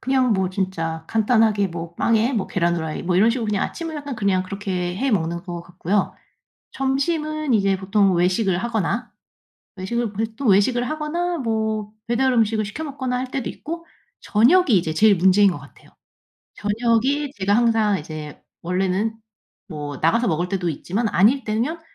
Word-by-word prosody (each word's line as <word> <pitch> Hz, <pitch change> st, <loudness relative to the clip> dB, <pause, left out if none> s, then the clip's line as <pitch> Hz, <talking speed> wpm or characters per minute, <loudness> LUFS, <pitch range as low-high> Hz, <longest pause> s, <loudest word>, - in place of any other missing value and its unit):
그냥 260 Hz, -2 st, +2 dB
뭐 190 Hz, -2 st, 0 dB
진짜 165 Hz, -4 st, -3 dB
간단하게 220 Hz, -2 st, +2 dB
뭐 170 Hz, 0 st, -7 dB
빵에 230 Hz, +6 st, +2 dB
뭐 215 Hz, -6 st, -1 dB
계란 170 Hz, -2 st, 0 dB
후라이 160 Hz, -2 st, -4 dB
뭐 175 Hz, 0 st, 0 dB
이런 220 Hz, +5 st, +5 dB
식으로 235 Hz, -2 st, -2 dB
그냥 205 Hz, -2 st, 0 dB
아침은 330 Hz, -2 st, -5 dB
약간 285 Hz, -3 st, -5 dB
그냥 195 Hz, -3 st, +1 dB
그렇게 185 Hz, -2 st, -3 dB
해 270 Hz, +5 st, 0 dB
먹는 170 Hz, -4 st, -1 dB
것 175 Hz, -2 st, -6 dB
같고요. 180 Hz, +3 st, -1 dB, 0.6 s
점심은 300 Hz, +1 st, -1 dB
이제 195 Hz, -2 st, +2 dB
보통 195 Hz, 0 st, +2 dB
외식을 180 Hz, +2 st, +2 dB
하거나 230 Hz, +2 st, -2 dB, 0.6 s
외식을 220 Hz, +4 st, -2 dB
보통 220 Hz, +2 st, -4 dB
또 275 Hz, -, -6 dB
외식을 240 Hz, +5 st, +3 dB
하거나 335 Hz, +3 st, -2 dB
뭐 220 Hz, -4 st, -2 dB, 0.2 s
배달 255 Hz, +2 st, +2 dB
음식을 220 Hz, -2 st, +2 dB
시켜 260 Hz, +10 st, -6 dB
먹거나 260 Hz, -4 st, -3 dB
할 255 Hz, 0 st, -4 dB
때도 265 Hz, -1 st, -3 dB
있고 335 Hz, +2 st, -7 dB, 0.4 s
저녁이 290 Hz, -, +4 dB
이제 165 Hz, -5 st, +2 dB
제일 210 Hz, +4 st, +5 dB
문제인 190 Hz, +2 st, +5 dB
것 145 Hz, -, -6 dB
같아요. 140 Hz, -, -17 dB, 0.7 s
저녁이 235 Hz, +7 st, 0 dB
제가 200 Hz, +1 st, +2 dB
항상 225 Hz, -4 st, +2 dB
이제 155 Hz, -1 st, -8 dB, 0.2 s
원래는 190 Hz, +5 st, 0 dB, 0.5 s
뭐 145 Hz, -3 st, -6 dB
나가서 230 Hz, +10 st, +2 dB
먹을 175 Hz, +3 st, 0 dB
때도 180 Hz, -3 st, -1 dB
있지만 200 Hz, +8 st, -2 dB
아닐 240 Hz, +9 st, +3 dB
때면 240 Hz, +10 st, -2 dB
210 Hz, 340 characters per minute, -22 LUFS, 185-245 Hz, 0.7 s, 이런